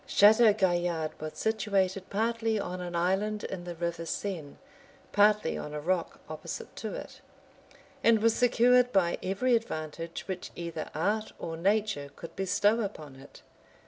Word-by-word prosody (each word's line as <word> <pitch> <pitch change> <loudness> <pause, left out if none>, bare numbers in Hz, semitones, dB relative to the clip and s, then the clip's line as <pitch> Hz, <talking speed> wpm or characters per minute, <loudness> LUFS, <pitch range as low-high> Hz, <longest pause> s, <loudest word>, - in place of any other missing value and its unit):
} - - -27
Chateau 220 +2 +7
Gaillard 175 -5 0
was 155 0 -5
situated 195 -4 0
partly 225 +1 0
on 180 -2 -4
an 175 -1 -5
island 195 +5 0
in 175 -2 -5
the 175 -1 -6
River 170 0 -3
Seine, 165 -4 -4 0.5
partly 210 +1 +4
on 150 0 -6
a - - -2
rock 170 +2 -1
opposite - - -7
to - - -4
it; - - -9 0.8
and 230 -1 +6
was 225 +1 +4
secured 245 +1 +4
by 180 -5 +2
every 200 +7 +1
advantage 165 -6 -4
which 185 -2 -5
either 170 -2 -5
art 210 +7 0
or 165 - -5
nature 195 -4 0
could 165 - -10
bestow 205 +4 +2
upon 155 -10 -6
it. 135 +1 -15
190 Hz, 150 wpm, -29 LUFS, 170-215 Hz, 0.8 s, Chateau